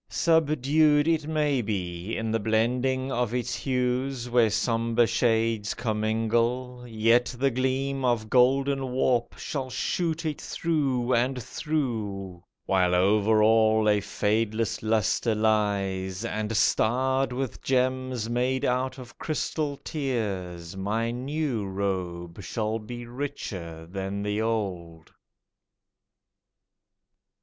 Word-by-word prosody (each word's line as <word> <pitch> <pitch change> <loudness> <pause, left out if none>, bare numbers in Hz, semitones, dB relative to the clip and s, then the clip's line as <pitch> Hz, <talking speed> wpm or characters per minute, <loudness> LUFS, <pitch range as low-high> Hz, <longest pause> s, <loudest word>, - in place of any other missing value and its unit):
Subdued, 155 -1 +3
It 160 -2 +1
may 150 -4 +1
be, 95 -2 -3
in 115 0 -2
the 115 - +1
blending 125 +5 0
of 120 -1 -1
its 125 0 -2
hues, 125 -1 -1
Where 120 -2 +4
sombre 115 +2 +2
shades 115 -3 +1
commingle, 115 +3 -1
yet 115 +2 +3
the 135 +2 +2
gleam 130 +2 -1
Of 120 -3 +1
golden 135 +2 +2
warp 125 -2 +1
shall 135 -3 -4
shoot 165 +4 -1
it 155 -2 -3
through 135 -7 0
and 125 +2 +1
through, 105 - -3 0.2
While 90 -2 +2
over 105 +3 +4
all 110 0 +4
a 105 -1 +3
fadeless 110 +1 -1
lustre 110 +1 +1
lies, 100 -2 0
And 110 -1 -2
starred 130 +5 +2
with 130 0 -4
gems 130 -2 0
made 125 +2 0
out 130 +2 0
of 130 -1 -12
crystalled 150 -2 -3
tears, 95 - -3
My 110 +4 -1
new 130 -1 -2
robe 95 -2 -3
shall 110 +5 -2
be 120 +2 -7
richer 95 - -6
than 95 +3 -4
the 105 +1 -1
old. 90 -8 -3
115 Hz, 110 wpm, -27 LUFS, 105-130 Hz, 0.2 s, Where